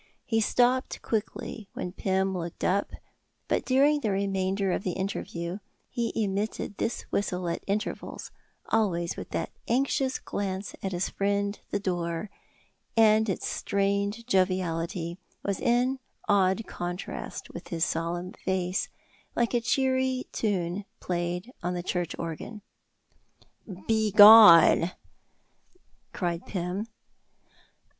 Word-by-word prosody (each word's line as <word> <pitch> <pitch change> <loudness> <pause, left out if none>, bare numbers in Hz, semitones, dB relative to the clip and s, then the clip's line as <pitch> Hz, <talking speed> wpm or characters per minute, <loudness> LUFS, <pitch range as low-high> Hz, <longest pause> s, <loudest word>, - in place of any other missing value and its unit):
He 225 -1 +1
stopped 250 +3 +1
quickly 220 -1 -3
when 180 - -4
Pym 190 0 0
looked 170 -1 -5
up, 200 +2 +1 0.6
but - - +1
during 280 +3 +4
the 225 -7 -1
remainder 195 0 0
of - - -1
the 185 -2 -2
interview 185 -1 -4 0.3
he 235 -1 -1
emitted 205 -1 -2
this 230 - -1
whistle 180 -3 -1
at 170 - -3
intervals, 210 +2 -3 0.4
always 175 -6 +1
with - - -7
that - - -3 0.2
anxious 265 +2 +1
glance 195 0 -4
at 195 - -3
his 180 0 -1
friend 200 +1 -1
the 205 - -1
door; 175 0 -2 0.7
and 220 -1 +5
its 190 - -2
strained 200 +3 -1
joviality 180 -3 0 0.2
was 200 -2 -1
in 250 +3 +2 0.3
odd 200 +1 +3
contrast 175 +2 -6
with - - -8
his 165 0 0
solemn 175 +3 -3
face, 185 0 -1 0.5
like 235 0 +1
a 240 - +2
cheery 260 +1 +1
tune 190 -2 -1 0.2
played 180 +6 -3
on 180 +1 -2
the 175 - -3
church 175 -2 -2
organ. 170 +6 -6 1.2
"Begone!" 210 -5 +8 1.2
cried 175 -1 -3
Pym. 185 +3 -3
195 Hz, 115 wpm, -28 LUFS, 180-220 Hz, 1.2 s, Begone